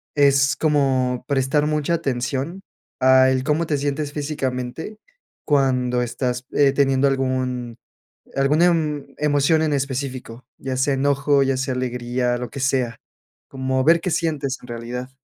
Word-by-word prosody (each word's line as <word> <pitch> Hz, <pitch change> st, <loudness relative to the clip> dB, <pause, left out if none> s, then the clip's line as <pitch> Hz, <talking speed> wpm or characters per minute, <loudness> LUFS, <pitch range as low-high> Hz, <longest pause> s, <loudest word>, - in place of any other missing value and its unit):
es 140 Hz, -1 st, +4 dB
como 135 Hz, -5 st, +1 dB
prestar 140 Hz, +1 st, +1 dB
mucha 150 Hz, +2 st, 0 dB
atención 135 Hz, +6 st, -3 dB, 0.4 s
al 130 Hz, 0 st, +4 dB
cómo 155 Hz, +3 st, +1 dB
te 145 Hz, -, 0 dB
sientes 145 Hz, +1 st, -2 dB
físicamente 140 Hz, -, -4 dB, 0.5 s
cuando 130 Hz, -4 st, +1 dB
estás, 125 Hz, +1 st, -3 dB
eh, 140 Hz, -1 st, +4 dB
teniendo 135 Hz, -1 st, +3 dB
algún 130 Hz, -3 st, -2 dB, 0.6 s
alguna 145 Hz, +5 st, +3 dB
em 150 Hz, -5 st, 0 dB
emoción 150 Hz, +1 st, +2 dB
en 155 Hz, -1 st, +1 dB
específico, 130 Hz, -3 st, -4 dB
ya 130 Hz, -1 st, -4 dB
sea 135 Hz, +2 st, +2 dB
enojo, 140 Hz, +1 st, +2 dB
ya 135 Hz, -1 st, 0 dB
sea 130 Hz, 0 st, -2 dB
alegría, 125 Hz, 0 st, -1 dB
lo 125 Hz, -2 st, -5 dB
que 140 Hz, -, -8 dB
sea, 130 Hz, -3 st, 0 dB, 0.5 s
como 130 Hz, 0 st, -1 dB
ver 165 Hz, +3 st, +4 dB
qué 180 Hz, -, -2 dB
sientes 150 Hz, -5 st, -1 dB
en 125 Hz, -, -13 dB
realidad. 120 Hz, +2 st, -6 dB
135 Hz, 140 wpm, -22 LUFS, 125-145 Hz, 0.6 s, es